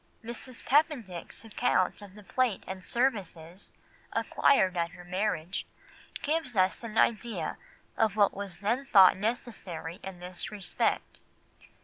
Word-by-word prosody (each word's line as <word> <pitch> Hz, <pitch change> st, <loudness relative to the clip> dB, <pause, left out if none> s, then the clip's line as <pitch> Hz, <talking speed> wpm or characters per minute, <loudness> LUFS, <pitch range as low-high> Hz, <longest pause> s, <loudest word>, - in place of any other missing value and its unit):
Mrs. 235 Hz, +2 st, -7 dB
Papendick's 250 Hz, -, 0 dB
account 210 Hz, -4 st, +1 dB
of 200 Hz, -1 st, -12 dB
the 210 Hz, -, -12 dB
plate 245 Hz, 0 st, 0 dB
and 190 Hz, -1 st, -6 dB
services 190 Hz, -7 st, -1 dB, 0.4 s
acquired 190 Hz, -9 st, +3 dB
at 170 Hz, 0 st, -1 dB
her 180 Hz, -1 st, -11 dB
marriage 185 Hz, -2 st, -2 dB, 0.6 s
gives 300 Hz, -6 st, -1 dB
us 185 Hz, +4 st, +2 dB
an 225 Hz, -1 st, -5 dB
idea 230 Hz, 0 st, +1 dB, 0.4 s
of 220 Hz, -3 st, +2 dB
what 205 Hz, -2 st, +4 dB
was 195 Hz, -3 st, -6 dB
then 240 Hz, +7 st, 0 dB
thought 190 Hz, -3 st, +8 dB
necessary 190 Hz, -6 st, -4 dB
in 190 Hz, -2 st, -7 dB
this 180 Hz, 0 st, -3 dB
respect. 200 Hz, -4 st, -1 dB
200 Hz, 125 wpm, -30 LUFS, 185-235 Hz, 0.6 s, thought